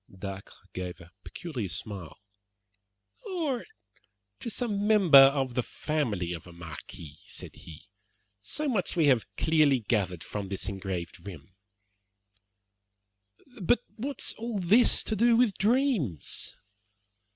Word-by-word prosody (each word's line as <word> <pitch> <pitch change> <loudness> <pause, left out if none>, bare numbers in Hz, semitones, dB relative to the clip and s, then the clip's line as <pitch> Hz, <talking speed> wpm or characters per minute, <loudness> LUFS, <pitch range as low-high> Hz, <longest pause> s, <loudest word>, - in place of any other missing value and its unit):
Dacre 95 0 -7 0.2
gave 90 -1 -5
a 85 -1 -15
peculiar 130 - -5
smile. 90 -1 -6 1.1
"Or 330 - -2 0.7
to 240 - -5
some 210 -3 -1
member 195 -10 +8
of 135 -2 +5
the 125 - +1
family 115 - -2
of 85 0 -8
a - - -11
marquis," 80 -2 -10
said - - -7
he. 80 -3 -12 0.6
"So 300 - -2
much 215 -9 0
we 165 -3 +3
have 130 -5 +3
clearly 155 -4 +4
gathered 95 -6 -1
from 100 -2 -5
this 95 - -4
engraved 95 -4 -5
rim." 95 -3 -10 2.1
"But 230 +7 +3
what 275 +5 -4
has - - -1
all 230 -1 -3
this 200 +7 +4
to 220 - -1
do 230 +2 +4
with 240 -5 +3
dreams?" 215 - +1
135 Hz, 125 wpm, -29 LUFS, -, 2.1 s, member